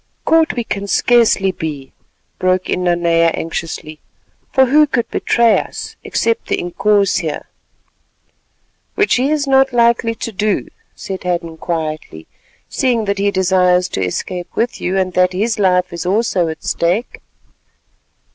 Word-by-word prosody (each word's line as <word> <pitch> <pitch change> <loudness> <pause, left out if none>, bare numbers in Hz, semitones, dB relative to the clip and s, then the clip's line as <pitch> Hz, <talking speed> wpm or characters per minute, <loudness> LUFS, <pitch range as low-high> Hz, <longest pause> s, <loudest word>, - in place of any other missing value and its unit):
"Caught 325 0 +3
we 240 - -1
can 200 -2 -4
scarcely 220 -4 +3
be," 150 -6 -6 0.5
broke 185 0 0
in 180 - -1
Nanea 170 -1 +3
anxiously, 160 -1 -5 0.5
"for 265 - +4
who 300 +4 +4
could 240 -4 -1
betray 235 -2 +3
us, - - -7
except 230 0 -1
the - - 0
Inkoos 200 +2 +1
here——" 160 -5 -4 1.5
"Which 415 - +2
he 260 +3 +1
is 300 -1 0
not 270 -1 +3
likely 235 -1 +2
to 230 - -5
do," 210 0 -1 0.3
said 190 -1 -6
Hadden 170 -2 -2
quietly, 155 - -4 0.4
"seeing 240 -4 0
that 200 0 -1
he 200 0 +2
desires 180 -1 +2
to 95 - -2
escape 175 - -4
with 235 +1 -1
you, 185 +2 -1
and 185 -1 0
that 180 +1 +2
his 215 +4 -1
life 180 -2 +2
is 170 - -4
also 195 -3 +1
at 160 0 -6
stake." 180 +8 -1
190 Hz, 145 wpm, -17 LUFS, 175-230 Hz, 1.5 s, for